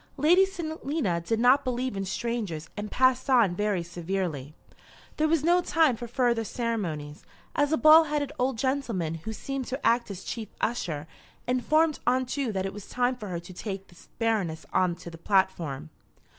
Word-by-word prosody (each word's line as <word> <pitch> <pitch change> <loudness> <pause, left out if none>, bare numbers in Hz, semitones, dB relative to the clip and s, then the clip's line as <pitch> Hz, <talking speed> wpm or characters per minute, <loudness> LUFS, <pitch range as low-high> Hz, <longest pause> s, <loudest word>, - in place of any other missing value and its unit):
Lady 350 +7 +5
Selina 315 - -2
did 220 +6 -1
not 255 +4 +5
believe 255 -2 -2
in 195 0 -2
strangers 200 -7 -3
and 210 0 -5
passed 255 +2 +2
on 230 -9 +4
very 205 -3 0
severely. 170 -4 -4 0.6
There 310 - +2
was 315 -2 +2
no 350 +2 +4
time 320 -7 +3
for 240 +1 -7
further 240 -1 +1
ceremonies, 185 -11 -3 0.3
as 290 0 +2
a 315 - +3
bald 310 +1 +7
headed 295 -2 -1
old 255 -1 +1
gentleman, 235 - -1
who 165 +7 -6
seemed 270 +3 -4
to 265 +3 -4
act 235 0 +3
as 190 -1 -7
chief 225 -2 -5
usher, 165 -10 -2 0.4
informed 305 +5 +2
Aunt 255 0 +2
Ju 270 -4 -1
that 190 -2 -2
it 195 - -4
was 205 -1 -10
time 250 +1 +1
for 215 -4 -8
her 175 -3 -3
to 185 - -11
take 195 +1 -6
the 175 - -17
Baroness 210 -9 -1
on 185 -2 +2
to 170 0 -10
the 165 - -11
platform. 165 -7 0
230 Hz, 180 wpm, -27 LUFS, 185-265 Hz, 0.6 s, bald